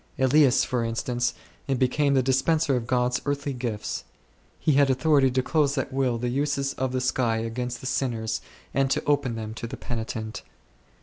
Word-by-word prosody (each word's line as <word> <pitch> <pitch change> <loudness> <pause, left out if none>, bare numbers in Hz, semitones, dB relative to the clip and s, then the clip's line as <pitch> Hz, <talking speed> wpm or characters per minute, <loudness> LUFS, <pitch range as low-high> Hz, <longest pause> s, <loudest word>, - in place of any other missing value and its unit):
Elias, 135 0 +4
for 125 -2 -1
instance, 120 +2 -1 0.4
became 140 +3 +2
the 130 - +3
dispenser 135 +3 +2
of 120 -2 -2
God's 125 0 +1
earthly 145 0 -2
gifts; 120 -4 -4 0.5
he 155 - +1
had 140 -1 +4
authority 135 0 +4
to 130 0 0
close 145 -1 +1
at 130 0 -2
will 130 -3 +1
the 120 +1 -2
uses 140 +1 0
of 130 -1 -2
the 130 - -1
s1<y 120 -3 0
against 125 +1 -4
the - - -9
sinners 115 -4 -1 0.3
and 135 -1 +2
to - - 0
open 145 -5 +1
them 110 -1 -5
to 115 +1 -6
the - - -7
penitent. 110 -2 -4
130 Hz, 175 wpm, -26 LUFS, 120-140 Hz, 0.5 s, Elias